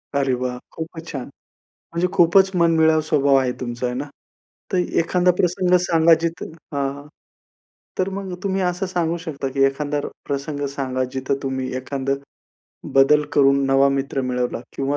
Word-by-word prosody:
अरे, 135 -2 +2
वाह! 125 -1 -2
खूपच 160 0 -7
छान. 135 -5 -4 0.7
म्हणजे 170 +2 +1
खूपच 190 +1 +5
मनमिळावू 160 -2 +4
स्वभाव 140 -3 +2
आहे 130 -2 +2
तुमचा 120 0 -4
आहे 125 0 -2
ना. 140 +3 -3 0.7
तर 185 - +1 0.2
एखादा 180 +2 +2
प्रसंग 180 0 +1
सांगा 165 -1 +5
जिथं 170 0 -3 0.2
हां, 140 -1 0
हां. 145 +1 -11 0.9
तर 185 - +1
मग 195 -2 -5
तुम्ही 195 -1 -1
असं 180 +1 -1
सांगू 175 -2 -1
शकता, 140 -5 -4
की 135 +1 0
एखादा 145 +2 0 0.3
प्रसंग 145 +1 -3
सांगा 130 -2 -1
जिथं 130 +1 -1
तुम्ही 130 -1 -2
एखादं 135 +1 -2 0.8
बदल 135 +2 +5
करून 140 -1 +4
नवा 135 +1 +4
मित्र 135 0 -1
मिळवला 125 -2 -2 0.2
किंवा 140 +1 0
145 Hz, 150 wpm, -21 LUFS, 135-170 Hz, 0.9 s, खूपच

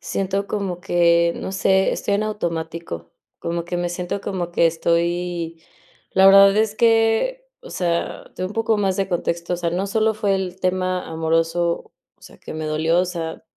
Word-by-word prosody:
Siento 195 +1 -2
como 190 -4 -3
que, 170 -2 +3
no 190 - -5
sé, 190 0 +2
estoy 200 - -1
en 210 +1 0
automático. 165 - -4 0.3
Como 170 0 -3
que 175 +1 -4
me 175 0 -1
siento 175 +2 -4
como 180 -3 -3
que 170 -1 +3
estoy 170 0 -1 0.5
La 190 - +5
verdad 195 +1 +8
es 215 -1 +2
que 230 - +2 0.2
O - - -11
sea, 170 -2 -2
te - - -6
doy 185 - -1
un - - -9
poco 225 -1 +1
más 195 -2 +1
de 195 -1 -1
contexto. 170 0 -2
O - - -3
sea, 170 -1 -2
no 185 +4 -1
solo 220 +1 +1
fue 205 -2 0
el 185 -1 -3
tema 185 0 -1
amoroso, 165 +1 0 0.2
o - - -34
sea, - - -14
que - - -9
me 155 0 -4
dolió, 160 +3 +1
o 185 - +1
sea, 165 -3 -5
180 Hz, 190 wpm, -21 LUFS, 170-195 Hz, 0.5 s, verdad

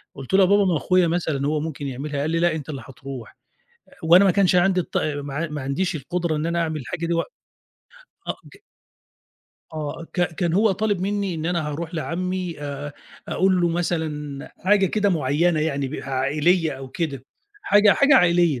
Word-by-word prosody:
قُلت 135 +5 -8
له: 190 - +6
"يا - - +7
بابا 200 +2 +4
ما 180 -4 +2
أخويا 180 +4 +2
مثلًا 160 -5 -1
هو 150 0 0
ممكن 150 -2 -5
يعملها." 140 +2 -4
قال 150 - -1
لي: 165 - +1
"لأ، 170 -2 +2
أنت 150 -1 -7
اللي 140 -3 -5
هترُوح." 135 -3 -9 0.7
وأنا 175 +4 +6
ما 190 - +5
كانش 190 -1 +3
عندي 185 +1 +3
الط - - -6
ما 145 -2 -3
ع 160 +2 -2
ما 150 -2 -5
عنديش 155 +6 -1
القُدرة 165 +3 -2
إن 150 - -2
أنا 170 0 0
أعمل 160 -2 -2
الحاجة 165 +6 -4
دي 170 - 0
وق 165 - +1 1.0
أ - - +1 0.2
ج - - -15 1.2
آه، 155 +2 -5
ك 180 - -2
كان 170 0 -1
هو 205 +3 +3
طالب 205 -1 -1
منّي 200 -1 -1
إن 160 0 -3
أنا 170 -3 -1
هارُوح 160 +4 -5
لعمّي 180 0 -3
آآ 145 0 -5 0.4
أقول 185 -1 +2
له 175 - +3
مثلًا 155 -4 -3
حاجة 195 0 +3
كده 205 +2 +1
معيّنة 160 0 +1
يعني 140 -3 -1
ب 140 - -7
عائلية 150 +6 +1
أو 135 0 -8
كده، 140 -3 -4 0.4
حاجة 205 0 +5
حاجة 280 0 +4
عائلية. 170 - +3
165 Hz, 190 wpm, -23 LUFS, 145-180 Hz, 1.2 s, يا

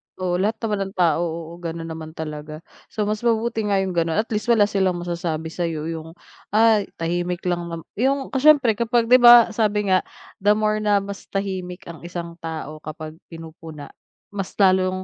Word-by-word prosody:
Oo, 180 -1 -1
lahat 210 +4 +1
naman 210 -2 -1
ng 195 - -12
tao 170 -3 +2
oo 165 0 -6
gano'n 165 -1 -5
naman 160 0 -8
talaga, 155 0 -7 0.2
so 215 - -3
mas 210 +1 -1
mabuti 225 -1 0
nga 195 -1 +2
'yong 190 - -3
gano'n 165 -2 0
at 220 +2 -1
least 215 0 -2
wala 230 -3 +5
silang 195 -3 +1
masasabi 170 -2 -3
sa'yo 165 -2 -3
'yong 165 0 -8 0.4
ay 220 -2 +4
tahimik 175 +1 -2
lang 175 -1 -1
naman 165 -1 -6 0.2
'yong 270 +2 0
kasi 265 +3 +1
siyempre 255 -8 +5
kapag 235 0 +1
'di 255 - +8
ba 240 -1 +8
sabi 210 -2 0
nga 185 - +5 0.4
the 205 +2 +4
more 215 0 +1
na 205 -2 +2
mas 200 0 -8
tahimik 190 -2 -4
ang 170 -1 -10
isang 170 -1 -7
tao 160 -2 -6
kapag 155 +1 -8
pinupuna, 160 -2 -10 0.4
mas 195 -2 -5
lalong 185 -1 +2
185 Hz, 185 wpm, -22 LUFS, 165-215 Hz, 0.4 s, di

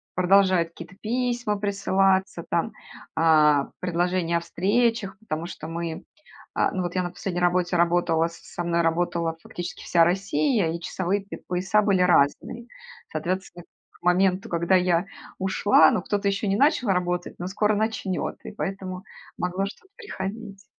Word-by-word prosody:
продолжают 185 -2 +4
какие-то 170 +2 -12
письма 240 -2 -1
присылаться, 195 -2 +1
там, 190 +6 0 0.4
а 150 -3 +4
предложения 175 -1 0
о - - 0
встречах, 200 +3 0
потому 165 -7 -4
что 155 -3 -8
мы, 165 -1 -4 0.5
а, - - +1
ну, 185 - -2
вот 175 0 -3
я 185 - +2
на 175 - -3
последней 180 0 -4
работе 180 0 +2
работала, 170 -1 +2
с 170 - -12
со 175 - -6
мной 170 0 +1
работала, 165 0 0
фактически, 175 0 -7
вся 170 -1 +4
Россия, 195 - +1
и 170 - -4
часовые 190 +3 -2
п 200 - -8
пояса 185 +4 +2
были 200 -3 +2
разные. 180 +8 +2 0.4
Соответственно, 180 -1 -4 0.3
к - - -25
моменту, 185 +2 +2
когда 170 +2 +2
я 180 -1 +2 0.3
ушла, 190 -3 +4
ну, - - 0
кто-то 205 +2 -1
ещё 200 +1 0
не 195 +1 +1
начал 275 -3 +3
работать, 180 -1 -1
но 175 - -4
скоро 210 +2 +1
начнёт, 210 -3 -2
и - - -6
поэтому 190 -2 -5 0.3
могло 180 +2 -1
что-то 375 - -11
приходить. 200 - -7
185 Hz, 155 wpm, -25 LUFS, 170-200 Hz, 0.5 s, продолжают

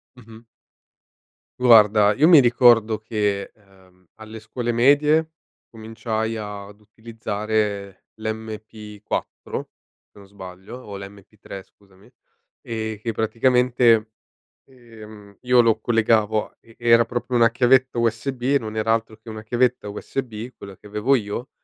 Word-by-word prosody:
Mh-mh. 115 -1 -16 1.1
Guarda 105 -4 +5
io 150 +8 +3
mi 165 -5 +8
ricordo 120 -3 +4
che, 105 -2 -3
ehm, 95 -3 -25
alle 110 0 -11
scuole 120 +2 -4
medie 150 +6 +3 0.4
cominciai 110 0 -4
ad 105 -1 -8
utilizzare 105 -2 -4
l'MP4 110 -1 -6 0.4
se 105 - -18
non 100 - -16
sbaglio, 95 +2 -11
o 100 -5 -9
l'MP3 100 0 -11
scusami, 100 0 -25 0.5
ehm, 110 -2 -5
che 115 +1 -3
praticamente, 115 0 +2 0.6
ehm, 110 -5 -15
io 125 -1 +4
lo 115 -1 +2
collegavo 110 -2 +1
a - - -32
e 115 - -21
era 115 -1 +4
proprio 120 +1 -3
una 115 -1 +4
chiavetta 125 +1 +2
USB 120 +3 -2
e 140 +3 +2
non 110 -3 -7
era 110 +1 0
altro 110 -1 -2
che 110 +1 -14
una 110 0 -8
chiavetta 120 -1 0
USB 115 +2 -6
quella 100 -1 -11
che 105 - -17
avevo 105 +6 0
io, 115 +2 -4
110 Hz, 130 wpm, -22 LUFS, 105-120 Hz, 1.1 s, mi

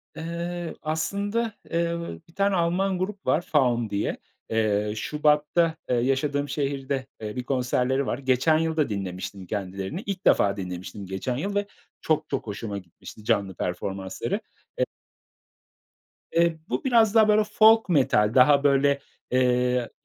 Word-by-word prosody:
Eee, 170 +1 -4
aslında, 200 +8 -1 0.2
eee, 170 0 0 0.3
1 165 - -21
tane 200 0 +2
Alman 180 +2 +1
grup 195 +1 -4
var 160 - +2
Faun 125 -9 +1
diye. 100 - -1 0.3
Eee, 105 -2 +1
Şubat'ta, 150 +5 +2
eee, 125 - +2
yaşadığım 140 +3 0
şehirde, 135 -2 -2
eee, 105 -1 -5
1 125 - -3
konserleri 130 +1 0
var. - - -1
Geçen 135 +4 +2
yıl 160 0 -1
da 150 -5 +2
dinlemiştim 95 -1 -5
kendilerini. 95 - -4
İlk 200 -2 -4
defa 100 0 +4
dinlemiştim 90 +1 -6
geçen 95 +7 -3
yıl 200 +8 -3
ve 205 0 0 0.3
çok 155 -1 0
çok 135 -4 -3
hoşuma 105 0 -4
gitmişti 95 +3 -12
canlı 100 -3 0
performansları 95 +2 -3 0.4
e - - +4 1.5
Eee, 170 -1 +2
bu - - -2
biraz 230 -5 +4
daha 220 -1 +6
böyle 215 0 +4
folk 220 0 +5
metal 120 -9 +3
daha 140 +3 +6
böyle, 140 0 +3 0.3
eee, 125 -1 +2
140 Hz, 140 wpm, -25 LUFS, 110-170 Hz, 1.5 s, daha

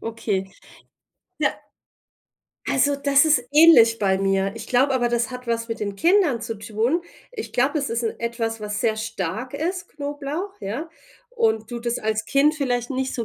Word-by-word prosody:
okay. 205 -4 -3 0.9
Ja. - - +2 1.2
Also, 285 +1 +2
das 280 0 +4
ist 305 -5 +3
ähnlich 290 -8 +7
bei 190 -2 +1
mir. 195 0 +1
Ich 230 - -8
glaube 265 +2 +2
aber, 245 -2 +1
das 235 0 0
hat 250 0 -8
was 230 0 -2
mit 230 -1 -4
den 200 -1 -3
Kindern 335 - +3
zu 225 -2 -5
tun. 225 +10 -1 0.3
Ich 435 -3 -7
glaube, 270 +5 +2
es 275 - -2
ist 230 +1 -2
'n 225 - -1
etwas, 230 -1 -3
was 210 -1 -4
sehr 220 -2 +1
stark 220 +3 -4
ist, 355 +5 -3
Knoblauch, 290 +6 -5
ja, 235 +12 -5 0.4
und 220 - 0
du 240 - -4
das 235 0 -2
als 215 0 -1
Kind 290 +2 +3
vielleicht 245 -5 -1
nicht 265 0 -2
so 235 - -2
240 Hz, 175 wpm, -23 LUFS, 220-285 Hz, 1.2 s, ähnlich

